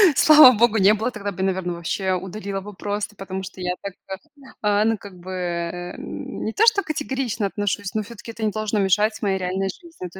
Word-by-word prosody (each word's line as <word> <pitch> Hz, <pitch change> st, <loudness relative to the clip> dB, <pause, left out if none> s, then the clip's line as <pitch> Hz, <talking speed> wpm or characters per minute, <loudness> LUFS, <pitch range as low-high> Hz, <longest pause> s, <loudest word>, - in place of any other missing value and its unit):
Слава 305 Hz, -3 st, +9 dB
богу, 225 Hz, 0 st, +3 dB
не 200 Hz, +1 st, +6 dB
было. 220 Hz, +3 st, -1 dB
Тогда 205 Hz, -4 st, -5 dB
бы, 190 Hz, -1 st, -6 dB
наверно, 190 Hz, -2 st, -1 dB
вообще 185 Hz, +3 st, -2 dB
удалила 195 Hz, +2 st, -4 dB
бы 205 Hz, +2 st, -9 dB
просто, 205 Hz, +1 st, -4 dB
потому 190 Hz, -1 st, -5 dB
что 190 Hz, 0 st, -9 dB
я 180 Hz, 0 st, -1 dB
так 200 Hz, -1 st, -6 dB
как, 190 Hz, 0 st, -6 dB, 0.4 s
а, 210 Hz, 0 st, +2 dB
ну, 225 Hz, 0 st, +2 dB
как 195 Hz, -2 st, -12 dB
бы, 180 Hz, +2 st, -9 dB
э, 175 Hz, -1 st, -4 dB
м, -, -, -7 dB
не 220 Hz, -, -2 dB
то, 435 Hz, -, +2 dB
что 410 Hz, -3 st, +5 dB
категорично 265 Hz, -8 st, -2 dB
отношусь, 205 Hz, 0 st, -3 dB
но 215 Hz, -, 0 dB
всё-таки 230 Hz, +1 st, -10 dB
это 225 Hz, 0 st, -7 dB
не 215 Hz, -, +1 dB
должно 215 Hz, 0 st, -2 dB
мешать 210 Hz, +3 st, +2 dB
моей 195 Hz, -2 st, +1 dB
реальной 190 Hz, +1 st, -1 dB
жизни. 330 Hz, -, -9 dB
То 190 Hz, -, -12 dB
200 Hz, 220 wpm, -23 LUFS, 190-215 Hz, 0.4 s, Слава